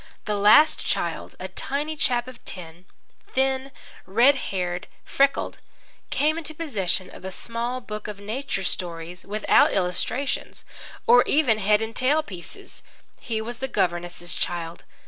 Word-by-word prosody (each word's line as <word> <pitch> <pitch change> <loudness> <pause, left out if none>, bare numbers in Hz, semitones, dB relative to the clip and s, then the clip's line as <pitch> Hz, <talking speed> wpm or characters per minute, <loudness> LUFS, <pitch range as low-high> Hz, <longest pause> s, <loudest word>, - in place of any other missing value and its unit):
The 210 - -1
last 210 +10 +6
child, - - -2
a - - -4
tiny 295 +3 -3
chap 245 -4 +1
of 255 -2 -11
ten, 175 -1 -6 0.5
thin, 265 0 +1 0.4
red 235 +9 +6 0.2
haired, 180 -2 -2 0.2
freckled, 275 0 +1 0.5
came 310 +3 +1
into 315 -1 -8
possession 200 - -1
of - - -12
a 190 - -5
small 235 +5 -3
book 210 -3 -6
of 210 -1 -6
nature 215 0 -3
stories 175 -1 -3
without 210 +2 +4
illustrations 195 +9 -1 0.4
or 245 +1 +8
even 260 -8 +3
head 210 +2 +3
and 220 +1 -5
tail 290 +5 +3
pieces. 185 - -10 0.4
He 220 -2 -3
was 235 +1 -6
the 265 - -1
governess's 175 -4 -1
child. 170 -1 -3
220 Hz, 140 wpm, -25 LUFS, 185-265 Hz, 0.5 s, or